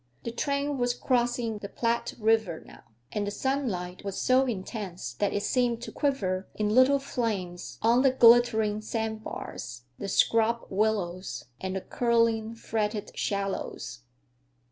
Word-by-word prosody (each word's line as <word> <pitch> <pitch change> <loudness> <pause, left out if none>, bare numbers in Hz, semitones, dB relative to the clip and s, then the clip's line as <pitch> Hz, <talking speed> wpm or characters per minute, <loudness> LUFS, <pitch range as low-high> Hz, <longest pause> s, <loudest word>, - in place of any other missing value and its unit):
The 230 - -3
train 280 +2 -1
was 245 0 +1
crossing 240 -3 0
the 200 - -7
Platte 235 0 -1
River 220 -7 +1
now, - - -14 0.3
and 205 +4 -2
the - - +1
sunlight 205 -8 -2
was 200 -1 -4
so 255 +1 +4
intense 195 -4 -4
that 205 - 0
it 205 - -1
seemed 240 -2 +1
to - - -6
quiver 195 -10 -1
in 210 -1 0
little 260 +3 +6
flames 210 -10 -3
on 235 +3 +5
the 270 - +5
glittering 230 -4 +5
sandbars, 215 - -5 0.2
the 200 - -4
scrub 230 +3 +2
willows, 195 -3 -1
and 190 0 -3
the 190 - -2
curling, 230 -1 +1
fretted 215 -2 -2
shallows. 195 -9 -3
225 Hz, 140 wpm, -28 LUFS, 200-245 Hz, 0.3 s, little